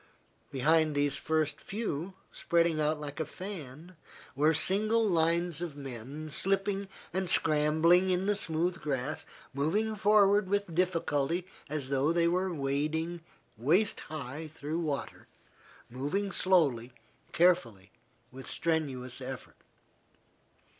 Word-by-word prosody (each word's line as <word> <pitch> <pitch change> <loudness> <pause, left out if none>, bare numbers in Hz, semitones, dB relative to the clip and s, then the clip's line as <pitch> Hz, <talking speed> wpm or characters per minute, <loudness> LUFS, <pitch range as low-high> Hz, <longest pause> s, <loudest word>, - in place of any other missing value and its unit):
Behind 155 +3 +2
these 145 -1 +1
first 155 -2 -1
few, 195 -4 -4 0.2
spreading 170 -2 +1
out 150 0 +1
like 145 0 -7
a - - +1
fan, 175 -3 -8 0.4
were 150 +3 +4
single 215 +7 +3
lines 170 -1 +1
of 165 -5 -5
men, 140 +3 -7
slipping 195 +3 0 0.3
and 185 -1 -1
scrambling 160 +4 +4
in 185 +1 +1
the 205 +1 +2
smooth 170 -1 -1
grass, 140 +1 -3 0.3
moving 200 +11 0
forward 205 -1 +4
with 200 -3 0
difficulty, 170 -2 0 0.2
as 140 -3 -3
though 140 +3 +2
they 170 0 +3
were 180 +2 +1
wading 155 +3 -1 0.4
waist 170 - +2
high 155 +1 -6
through 155 +1 -4
water, 150 -4 -4 0.6
moving 145 +11 -2
slowly, 140 -13 +2 0.4
carefully, 120 - +2 0.4
with 130 +1 -9
strenuous 135 -6 -2
effort. 130 0 -7
160 Hz, 115 wpm, -30 LUFS, 145-185 Hz, 0.6 s, were